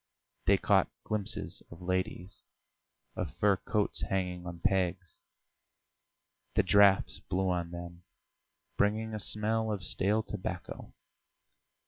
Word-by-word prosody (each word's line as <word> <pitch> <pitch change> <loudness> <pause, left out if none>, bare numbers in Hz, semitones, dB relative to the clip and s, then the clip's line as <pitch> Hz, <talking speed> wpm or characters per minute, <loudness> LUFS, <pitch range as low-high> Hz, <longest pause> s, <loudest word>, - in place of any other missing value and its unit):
They - - +6
caught - - +3
glimpses 105 -2 -2
of 85 - -12
ladies, 95 +1 -3 0.7
of - - -2
fur 100 -2 +2
coats 105 +2 0
hanging 90 -2 -2
on 85 -1 -7
pegs; 90 0 0 1.4
the - - +4
draughts 100 -1 +5
blew 95 0 -1
on 85 -1 -1
them, 85 0 -8 0.8
bringing 110 +2 +1
a 110 - -3
smell 110 +2 0
of 100 -3 -3
stale 105 +6 +1
tobacco. 105 -3 -6
95 Hz, 110 wpm, -31 LUFS, 90-105 Hz, 1.4 s, They